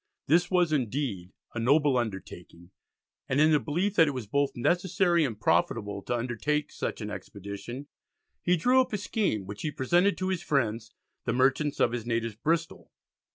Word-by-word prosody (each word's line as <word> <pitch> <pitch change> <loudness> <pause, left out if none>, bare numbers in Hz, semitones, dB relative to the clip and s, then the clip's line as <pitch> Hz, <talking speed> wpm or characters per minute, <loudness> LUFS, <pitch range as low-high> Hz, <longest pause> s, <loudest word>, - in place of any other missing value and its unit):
This 175 +4 +3
was 180 -4 +2
indeed 120 -8 -2 0.2
a 120 - -3
noble 140 +3 +3
undertaking, 95 -6 -5 0.6
and 130 - +1
in 155 +1 +5
the 150 - +5
belief 175 +8 -1
that 165 - +7
it 145 - -2
was 125 -4 -4
both 140 +6 0
necessary 175 +4 +2
and 115 -7 -3
profitable 100 +3 0
to 120 - -2
undertake 125 +6 -1
such - - -4
an 105 0 -4
expedition, 100 +6 -7 0.6
he 180 0 +2
drew 250 +10 +4
up 255 - -3
a - - +1
scheme 195 - -1
which 105 +1 -8
he 155 - -1
presented 175 +7 +2
to 185 0 -2
his 185 -3 -1
friends, 115 -8 -1 0.3
the 115 - 0
merchants 135 +4 +1
of 120 - +3
his 120 -1 -4
native 115 -2 -2
Bristol. 165 0 -1
135 Hz, 175 wpm, -28 LUFS, 110-165 Hz, 0.6 s, that